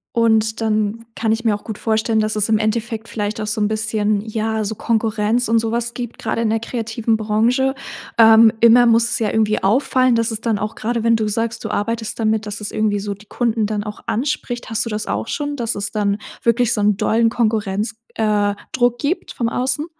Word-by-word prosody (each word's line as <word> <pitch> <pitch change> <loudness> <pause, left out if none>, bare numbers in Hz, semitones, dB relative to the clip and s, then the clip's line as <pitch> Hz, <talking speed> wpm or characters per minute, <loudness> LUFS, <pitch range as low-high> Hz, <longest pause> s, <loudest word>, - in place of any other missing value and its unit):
Und 220 -1 +2
dann 215 +1 -1
kann 225 -1 0
ich 225 +1 -1
mir 220 -3 +2
auch 205 - -10
gut 220 -2 -7
vorstellen, 220 0 +1
dass 215 0 0
es 210 -1 +2
im 220 -1 +2
Endeffekt 220 +1 -2
vielleicht 210 0 -3
auch 215 - -3
so 220 +1 -1
'n 210 - +2
bisschen, 215 -1 0
ja, 220 0 -2
so 215 +1 -3
Konkurrenz 225 +1 0
und 230 +1 +3
sowas 230 +1 -1
gibt, 240 -2 -6
grade 225 +1 -2
in 220 - +1
der 225 - +1
kreativen 225 -1 -2
Branche. 230 +5 +1 0.5
Ähm, 225 0 +8
immer 235 +1 +6
muss 230 0 +4
es - - +1
ja 220 -3 0
irgendwie 215 -1 +1
auffallen, 255 +4 +3
dass 230 0 +1
es 220 -2 -3
dann 225 -2 -1
auch 210 +2 -4
grade 230 +1 -2
wenn 230 0 +4
du 220 -1 0
sagst, 225 +2 -2
du - - -3
arbeitest 225 +2 -2
damit, 220 -1 +1
dass 210 0 -5
es 210 - -4
irgendwie 210 -1 0
so 200 0 -4
die 205 +2 -18
Kunden 225 -1 -1
dann 205 0 -2
auch 210 0 -8
anspricht, 245 -1 -3
hast 225 +1 0
du - - -4
das 210 -1 -3
auch 110 +2 -2
schon, 290 0 -3
dass 235 -4 -1
es 200 - -3
dann 205 -1 0 0.2
wirklich 235 0 +2
so - - -2
'n 205 0 +3
dollen 225 +2 +2
Konkurrenz 215 -2 -1 0.2
äh, 210 -2 +1 0.2
Druck 245 -1 +1
gibt 310 +7 -2
vom 235 -2 -1
Außen? 260 +5 -1
220 Hz, 220 wpm, -19 LUFS, 215-230 Hz, 0.5 s, Ähm